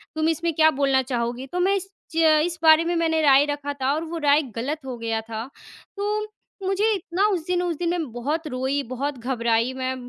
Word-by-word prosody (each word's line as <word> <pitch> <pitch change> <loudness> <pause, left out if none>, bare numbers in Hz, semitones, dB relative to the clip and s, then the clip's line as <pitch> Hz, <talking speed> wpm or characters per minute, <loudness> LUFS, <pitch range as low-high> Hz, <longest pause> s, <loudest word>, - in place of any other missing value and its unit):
तुम 315 0 +1
इसमें 330 +1 -1
क्या 315 +1 +5
बोलना 270 -1 +3
चाहोगी?" 245 0 -3
तो 360 +6 -4
मैं 385 +2 +3
इस 390 0 -4 0.3
ज - - -3 0.3
इस 345 -1 -3
बारे 315 0 +7
में 345 - 0
मैंने 320 -1 +1
राय 280 -1 +6
रखा 290 -1 -3
था 275 0 0
और 315 +2 -2
वो 335 +1 -5
राय 290 +1 +5
गलत 285 +7 -3
हो 250 -2 -5
गया 225 -1 -2
था। 225 0 -6 0.5
तो 420 +1 -1 0.4
मुझे 390 +3 +1
इतना 370 +1 -1
उस 360 -6 -1
दिन 360 0 +1
उस 345 -2 -1
दिन 345 -1 -1
मैं 330 -8 -2
बहुत 290 +8 -3
रोई, 265 +2 -1
बहुत 275 +2 -3
घबराई 235 0 0
मैं, 260 0 -3
295 Hz, 215 wpm, -24 LUFS, 260-340 Hz, 0.5 s, बारे